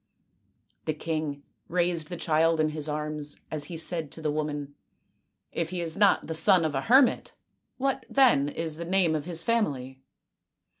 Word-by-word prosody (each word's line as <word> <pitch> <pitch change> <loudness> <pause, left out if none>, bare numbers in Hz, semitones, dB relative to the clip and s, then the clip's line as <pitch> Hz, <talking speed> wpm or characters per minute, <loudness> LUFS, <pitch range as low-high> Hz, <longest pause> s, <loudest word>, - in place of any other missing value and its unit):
" - - -45
The 155 - 0
king 155 -3 -4 0.2
raised 170 -2 0
the 175 - -5
child 165 0 +2
in 155 0 +2
his 155 0 -3
arms 150 -1 -4
as 150 -2 0
he 170 - -7
said 165 -2 +1
to 160 - -8
the 150 - 0
woman, 145 -1 -4 0.4
" - - -47 0.3
If 165 -1 -3
he 180 0 -4
is 165 -1 -2
not 200 -1 +3
the 160 - -4
son 165 +1 +5
of 155 - -1
a 135 - -1
hermit, 255 - +3 0.4
what, 270 0 -2
then, 235 - +4
is 160 0 -3
the 170 - -5
name 180 -2 +2
of 150 -2 -2
his 170 -2 -1
family 135 - -1
160 Hz, 185 wpm, -27 LUFS, 150-175 Hz, 0.4 s, son